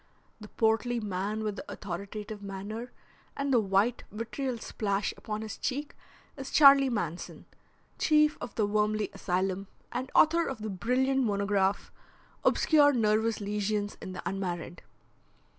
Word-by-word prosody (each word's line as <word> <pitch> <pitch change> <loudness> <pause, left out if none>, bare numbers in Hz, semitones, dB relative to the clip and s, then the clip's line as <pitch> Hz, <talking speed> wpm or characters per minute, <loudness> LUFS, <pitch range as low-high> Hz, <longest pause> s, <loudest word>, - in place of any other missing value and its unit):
The 210 - -10
portly 225 +3 +1
man 205 +1 -3
with 210 -2 -3
the - - -8
authoritative 205 +3 -6
manner 205 +5 -6 0.5
and 280 -1 0
the 240 - +6
white, 205 +4 +1
vitriol 235 +4 -3
splash 200 -3 -2
upon 215 0 -5
his 215 - -7
cheek 285 +2 -3 0.4
is 270 -1 -7
Charley 275 -2 +7
Manson, 180 -8 -4 0.5
chief 305 -1 +4
of - - -7
the 215 - +2
Wormley 210 +1 0
Asylum, 190 0 -1 0.2
and 255 +1 -3
author 335 +2 +5
of 240 -5 -5
the 215 - -3
brilliant 260 +7 +1
monograph 200 -2 0 0.5
Obscure 290 -2 +5
Nervous 220 -1 +2
Lesions 205 0 -2
in 185 - -6
the - - -7
Unmarried. 175 -3 -4
215 Hz, 135 wpm, -29 LUFS, 200-250 Hz, 0.5 s, Charley